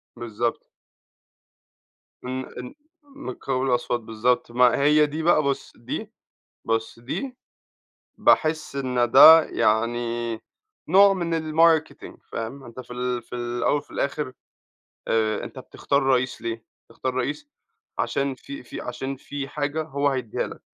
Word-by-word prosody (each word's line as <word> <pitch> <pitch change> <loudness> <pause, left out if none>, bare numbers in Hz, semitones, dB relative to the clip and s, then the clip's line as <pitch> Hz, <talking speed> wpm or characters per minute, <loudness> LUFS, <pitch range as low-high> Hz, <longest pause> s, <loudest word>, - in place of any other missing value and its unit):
بالضبط. 120 0 -3 1.6
إن 130 +1 -3
إن 125 - -8 0.3
م 280 0 -14
مٌقابل 135 -1 -2
الأصوات 120 -1 0
بالضبط. 115 +2 0
ما 125 0 +4
هي 150 +1 +5
دي 155 +2 -4
بقى 155 -3 +4
بُص 140 -1 -2
دي - - -6 0.5
بُص، 115 0 -2
دي 250 - -5 0.8
باحس 155 -2 +2
إن 125 -3 0
ده 160 +5 +10
يعني 115 +1 0 0.5
نوع 195 +4 +6
من 170 -3 -2 0.2
الmarketing 160 -1 +2
فاهم؟ 115 +5 -5
أنت 120 0 -11
في 125 -1 -9
ال 125 0 -2
في 115 - -10
ال 120 0 -4
الأول 120 +4 +2
وفي - - -10
الآخر 140 -2 -2 0.8
آآ 110 -1 +1
أنت - - -9
بتختار 140 0 -1
رئيس 130 -1 +1
ليه؟ 115 -1 -4 0.2
بتختار 125 +2 -4
رئيس 145 +3 -3 0.5
عشان 140 -1 -1
في 140 +1 -9
في 120 - -8
عشان 135 +2 -5
في 140 +1 -6
حاجة 145 +2 -2
هو 145 -2 -1
هيدّيها 130 -5 -2
لك - - -10
130 Hz, 135 wpm, -24 LUFS, 120-145 Hz, 1.6 s, ده